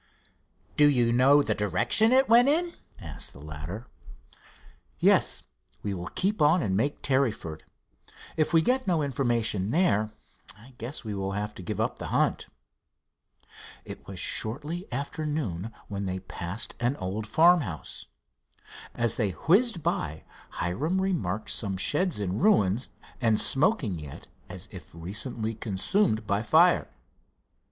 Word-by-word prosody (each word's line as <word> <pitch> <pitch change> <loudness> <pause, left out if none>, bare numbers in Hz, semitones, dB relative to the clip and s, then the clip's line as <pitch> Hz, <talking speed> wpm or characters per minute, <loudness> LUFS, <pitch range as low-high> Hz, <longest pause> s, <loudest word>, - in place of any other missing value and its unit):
"Do 150 0 +7
you 120 -4 +2
know 135 +4 +5
the - - 0
direction 120 - +3
it 265 +1 +4
went 240 +3 +6
in?" 340 +3 +1 0.3
asked 80 -8 -6
the - - -13
latter. 75 - -7 1.1
"Yes. - - +3 0.4
We 100 - -2
will 90 -1 -5
keep 195 0 -1
on 155 +4 +4
and 95 -2 0
make 140 +8 -1
Tarryford. 120 - 0 0.7
If 155 -1 +1
we 165 -1 +4
get 255 +3 +1
no 170 -5 +2
information 115 -7 0
there, 115 - +2 0.5
I 120 +5 -16
guess 125 +7 -5
we 105 - -4
will 95 0 -3
have 105 +1 -3
to - - -10
give 85 - -5
up - - -1
the - - -5
hunt." - - 0 1.4
It - - -10
was 95 -2 -7
shortly 150 - -1
after 140 +5 -4
noon 115 - -3 0.2
when 100 -1 -4
they 95 0 -3
passed 90 +3 -4
an 120 +3 0
old 100 +2 -4
farmhouse. 155 - +2 0.9
As 120 -1 +1
they 105 -5 0
whizzed 190 - +3
by, 80 -1 -2 0.3
Hiram 145 - -1
remarked 130 - -2
some 100 -4 -2
sheds 150 - 0
in 95 -1 -2
ruins, 120 - +2 0.3
and 110 -3 +3
smoking 135 - +1
yet 75 -3 -10 0.2
as - - -8
if - - -11
recently 105 +6 -3
consumed 110 - 0
by 100 0 0
fire. 165 +9 +4
115 Hz, 140 wpm, -27 LUFS, 100-160 Hz, 1.4 s, Do